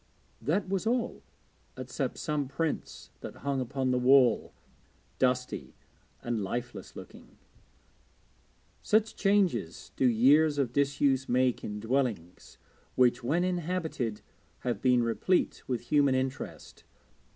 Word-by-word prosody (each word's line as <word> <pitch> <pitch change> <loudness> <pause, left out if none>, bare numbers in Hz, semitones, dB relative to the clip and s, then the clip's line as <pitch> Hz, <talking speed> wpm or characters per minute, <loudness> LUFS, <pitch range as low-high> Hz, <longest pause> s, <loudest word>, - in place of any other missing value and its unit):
That 165 - 0
was 195 +3 -2
all, 240 0 -1 0.6
except - - -4
some 150 -3 -2
prints 155 +4 -4
that - - -8
hung 140 -2 0
upon 130 +1 -1
the 125 - +1
wall, 125 -2 +4 0.7
dusty 125 -1 -1 0.5
and 120 -3 -2
lifeless 120 +5 -5
looking. - - -13 1.4
Such 215 +1 +1
changes 185 - 0
do 130 - +3
years 145 +6 +4
of 130 -4 0
disuse 140 -1 +1
make 125 0 +1
in 105 0 -5
dwellings 110 -7 -2 0.4
which, 125 -1 +3
when 160 +8 +1
inhabited, 170 - -2 0.4
have 120 -5 -2
been 125 -2 +3
replete 115 +11 0
with 125 -3 -2
human 140 -3 +4
interest. 130 +1 -4
130 Hz, 115 wpm, -29 LUFS, 120-155 Hz, 1.4 s, wall